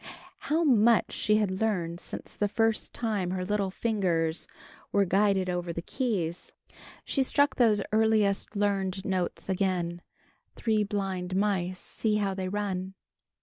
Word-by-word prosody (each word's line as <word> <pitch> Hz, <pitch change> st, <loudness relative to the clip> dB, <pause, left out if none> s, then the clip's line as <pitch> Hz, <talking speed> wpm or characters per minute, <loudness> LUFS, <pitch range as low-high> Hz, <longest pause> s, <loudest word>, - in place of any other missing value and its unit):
How 320 Hz, +3 st, +3 dB
much 235 Hz, -5 st, +4 dB
she 210 Hz, -, +2 dB
had 200 Hz, -2 st, 0 dB
learned 175 Hz, -6 st, 0 dB
since -, -, -8 dB
the 205 Hz, -, +1 dB
first 225 Hz, +1 st, 0 dB
time 210 Hz, -6 st, -2 dB
her 185 Hz, 0 st, -2 dB
little 200 Hz, 0 st, 0 dB
fingers 180 Hz, -7 st, 0 dB, 0.4 s
were 200 Hz, -1 st, +3 dB
guided 195 Hz, 0 st, +2 dB
over 175 Hz, -1 st, -2 dB
the 170 Hz, 0 st, -5 dB
keys. 185 Hz, -, -2 dB, 0.5 s
She 275 Hz, -, 0 dB
struck 285 Hz, +2 st, +2 dB
those 215 Hz, -5 st, +4 dB
earliest 215 Hz, -2 st, +2 dB
learned 195 Hz, -2 st, 0 dB
notes 185 Hz, -2 st, -2 dB
again: 180 Hz, -3 st, -1 dB, 0.5 s
"Three 220 Hz, -2 st, +1 dB
blind 190 Hz, -3 st, -3 dB
mice! 190 Hz, -2 st, 0 dB
See 215 Hz, +3 st, -2 dB
how 200 Hz, -2 st, 0 dB
they 190 Hz, -1 st, -3 dB
run!" 190 Hz, -2 st, -3 dB
195 Hz, 140 wpm, -28 LUFS, 185-215 Hz, 0.5 s, much